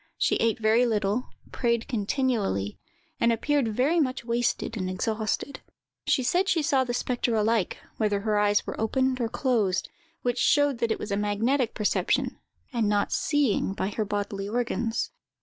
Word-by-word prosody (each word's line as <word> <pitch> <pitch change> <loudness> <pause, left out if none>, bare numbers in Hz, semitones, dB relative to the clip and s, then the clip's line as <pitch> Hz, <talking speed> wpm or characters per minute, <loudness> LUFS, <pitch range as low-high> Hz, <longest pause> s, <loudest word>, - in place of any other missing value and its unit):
She - - +2
ate 225 -1 +1
very 225 +2 +3
little, 215 +2 0 0.2
prayed 235 -2 0
continually, 210 - -1 0.4
and 235 - +4
appeared 275 +3 +1
very 260 +10 +2
much 255 -5 -1
wasted 235 0 -1
and 185 -4 -2
exhausted. 215 +7 -2 0.5
She 260 - +2
said 360 +10 +2
she 325 -3 +2
saw 280 -3 +3
the 245 - -3
spectre 245 -1 0
alike, 220 -2 +1 0.2
whether 205 -2 +1
her 210 0 +1
eyes 205 0 +2
were - - -5
opened 260 +3 +1
or 230 - 0
closed, 225 -8 0 0.3
which 245 0 0
showed 290 -2 +3
that 235 -2 0
it - - +1
was 210 - -6
a 200 - +1
magnetic 220 +5 0
perception, 210 - 0 0.3
and 225 -3 +1
not 205 -1 +1
seeing 275 -10 +1
by 190 - -1
her 215 +1 -2
bodily 200 -1 -3
organs. 235 0 -1
230 Hz, 165 wpm, -27 LUFS, 210-255 Hz, 0.5 s, and